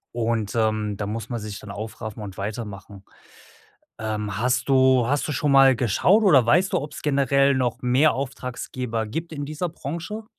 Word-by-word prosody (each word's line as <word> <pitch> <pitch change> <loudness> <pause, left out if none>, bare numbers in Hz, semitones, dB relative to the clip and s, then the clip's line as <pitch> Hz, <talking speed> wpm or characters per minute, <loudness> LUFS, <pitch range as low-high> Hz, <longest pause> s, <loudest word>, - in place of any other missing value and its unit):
Und, 115 -3 -1
ähm, 110 -2 0
da 100 - -3
muss 110 +1 -5
man 120 -2 -3
sich 105 -1 -7
dann 105 - -9
aufraffen 110 +1 -7
und 100 -2 -8
weitermachen. 100 -1 -7 0.9
Ähm, 105 -2 -3
hast 125 +3 0
du 130 -2 +4
hast 145 +4 0
du - - -1
schon 145 +1 0
mal 135 -1 +6
geschaut 130 - +3
oder 140 - +6
weißt 175 +11 +3
du, - - +2
ob's 145 +1 -8
generell 140 -1 +3
noch 125 -3 -1
mehr 130 +5 +4
Auftraggeber 125 -3 -4
gibt 160 +10 -5
in 145 -2 -4
dieser 155 +5 -3
Branche? 170 +8 -6
125 Hz, 175 wpm, -23 LUFS, 110-140 Hz, 0.9 s, mal